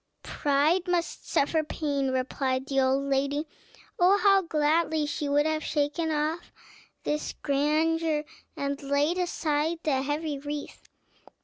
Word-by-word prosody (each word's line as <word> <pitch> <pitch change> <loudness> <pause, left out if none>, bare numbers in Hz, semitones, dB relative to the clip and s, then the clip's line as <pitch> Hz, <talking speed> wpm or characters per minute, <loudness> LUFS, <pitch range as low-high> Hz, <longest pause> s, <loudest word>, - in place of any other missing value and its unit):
"Pride 300 +6 +1
must 350 -1 -2
suffer 315 +3 +2
pain," 285 -3 -2
replied 260 0 -1
the 275 -1 0
old 265 +1 +2
lady. 280 +2 0 0.5
Oh, 365 +3 +5
how 395 -1 +5
gladly 315 -1 +1
she 290 0 -3
would 290 +1 +3
have 310 -1 0
shaken 300 +2 -1
off 310 +2 -2
all - - -25
this 300 0 -2
grandeur, 310 +2 +1 0.3
and 280 0 -2
laid 285 +5 +1
aside 320 -2 0
the 270 -4 +1
heavy 290 +1 -2
wreath! 290 +1 -7
295 Hz, 130 wpm, -27 LUFS, 280-320 Hz, 0.5 s, Oh